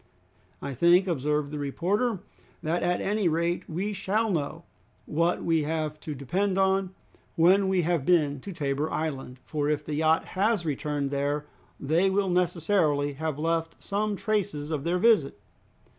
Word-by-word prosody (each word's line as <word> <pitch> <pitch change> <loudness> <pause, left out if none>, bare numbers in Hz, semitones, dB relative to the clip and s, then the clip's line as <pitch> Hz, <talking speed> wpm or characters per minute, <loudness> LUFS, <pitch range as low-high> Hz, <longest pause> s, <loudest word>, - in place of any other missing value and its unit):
"I 140 - -3
think," 175 +7 +5
observed 150 -2 0
the 150 - -4
reporter, 190 - -1 0.4
"that 170 +2 0
at 175 0 0
any 205 -1 +1
rate 170 +2 -1
we 195 +6 -2
shall 215 +3 0
know 160 0 -2 0.4
what 170 +3 0
we 165 -2 +2
have 155 0 -2
to 150 - -6
depend 185 +9 -1
on 190 -1 +1 0.4
when 190 +4 +5
we 190 -2 +2
have 170 -3 +1
been 150 -4 +2
to 195 - -8
Tabor 145 -2 -1
Island, 135 -5 -3
for 150 -1 -1
if 150 0 -1
the 155 - -4
yacht 160 +2 +2
has 200 -1 +1
returned 145 -1 -2
there, 145 +1 -1 0.3
they 165 +7 +2
will 190 -1 +1
necessarily 165 -5 +1
have 155 0 -3
left 165 +1 -1
some 210 +1 -2
traces 200 -9 -2
of 150 -1 -2
their 175 +2 +1
visit." 180 - +3
165 Hz, 160 wpm, -27 LUFS, 150-190 Hz, 0.4 s, think